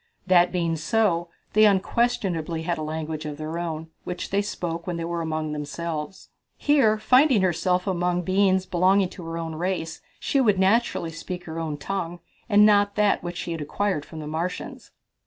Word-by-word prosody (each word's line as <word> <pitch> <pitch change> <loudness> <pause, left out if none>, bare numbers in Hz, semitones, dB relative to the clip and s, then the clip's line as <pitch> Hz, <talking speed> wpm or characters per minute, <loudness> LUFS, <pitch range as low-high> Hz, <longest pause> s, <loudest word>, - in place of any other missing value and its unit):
That 180 -1 +5
being 170 -2 0
so, 175 -2 +1 0.2
they 215 +1 +6
unquestionably 190 -5 +1
had 170 -1 -1
a - - -3
language 155 0 -4
of 150 -1 -6
their 155 +2 -4
own, 160 -1 -4
which 180 0 -5
they 200 +1 +2
spoke 170 -4 -4
when 175 -2 -2
they 165 - -3
were 170 0 -2
among 155 -1 -2
themselves. 150 +3 -5 0.3
Here 270 -8 +3
finding 255 -1 +4
herself 180 +1 +1
among 180 -2 0
beings 190 0 +2
belonging 185 +2 +3
to 180 - -10
her 165 0 -4
own 165 -1 -4
race, 165 -1 -3 0.2
she 275 - +1
would 210 -6 +3
naturally 190 -3 +2
speak 175 +2 -6
her 165 -1 -6
own 155 -3 -3
tongue 175 +2 -4 0.3
and 210 -1 +6
not 205 -1 +4
that 210 -1 +2
which 175 0 -5
she 170 - -4
had 165 -2 -4
acquired 185 +1 -1
from 160 - -10
the - - -6
Martians. 165 +4 -4
175 Hz, 180 wpm, -25 LUFS, 165-195 Hz, 0.3 s, they